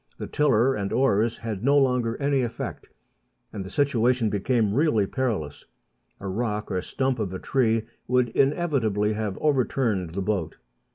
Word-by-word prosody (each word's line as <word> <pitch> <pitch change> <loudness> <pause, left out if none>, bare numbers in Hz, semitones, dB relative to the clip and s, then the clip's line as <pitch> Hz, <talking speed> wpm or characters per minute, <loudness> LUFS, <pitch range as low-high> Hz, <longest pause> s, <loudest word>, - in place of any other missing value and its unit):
The - - -5
tiller 135 -3 +2
and 100 -4 -3
oars 115 -3 +2
had 110 -3 -5
no 140 +2 +4
longer 125 -4 +2
any 140 -1 +1
effect, 120 -2 -5 0.7
and 100 -3 -4
the 95 - -8
situation 125 -4 +1
became 105 +1 +1
really 130 -6 +2
perilous; 100 - -3 0.5
a 100 - -6
rock 105 +1 -2
or 90 -1 0
stump 130 +5 -1
of 100 -4 -2
a - - -4
tree 115 -4 +1 0.2
would 125 -1 +2
inevitably 125 - +1
have 105 -2 -3
overturned 120 - 0
the 100 - -1
boat. 95 -6 -2
115 Hz, 155 wpm, -25 LUFS, 105-130 Hz, 0.7 s, no